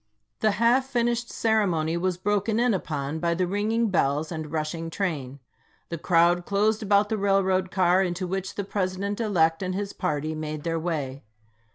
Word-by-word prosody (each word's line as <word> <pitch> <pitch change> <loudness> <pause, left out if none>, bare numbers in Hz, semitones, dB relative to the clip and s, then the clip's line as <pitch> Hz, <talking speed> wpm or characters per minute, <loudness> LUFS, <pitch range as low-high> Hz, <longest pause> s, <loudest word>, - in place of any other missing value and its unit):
The 215 -1 +2
half 245 +3 +3
finished 240 -2 0
ceremony 180 -8 +1
was 180 +1 -1
broken 205 +3 0
in 245 -1 +3
upon 150 -4 -3
by 170 0 0
the 180 +1 +1
ringing 215 +4 0
bells 150 -1 +1
and 155 -2 -5
rushing 160 +1 -3
train. 150 -8 -3 0.5
The 170 - -4
crowd 175 +1 +3
closed 210 +3 +1
about 205 0 +3
the 220 - -1
railroad 190 -2 +2
car 185 0 +3
into 180 0 -1
which 190 +1 -4
the 200 - -2
Pres 185 -2 -2
ident 200 +2 -3
elect 165 -7 +2
and 185 -1 -2
his 200 0 -3
party1 155 +1 -2
made 155 -1 -5
their 165 -1 -1
way. 145 -5 -3
185 Hz, 175 wpm, -26 LUFS, 160-205 Hz, 0.5 s, half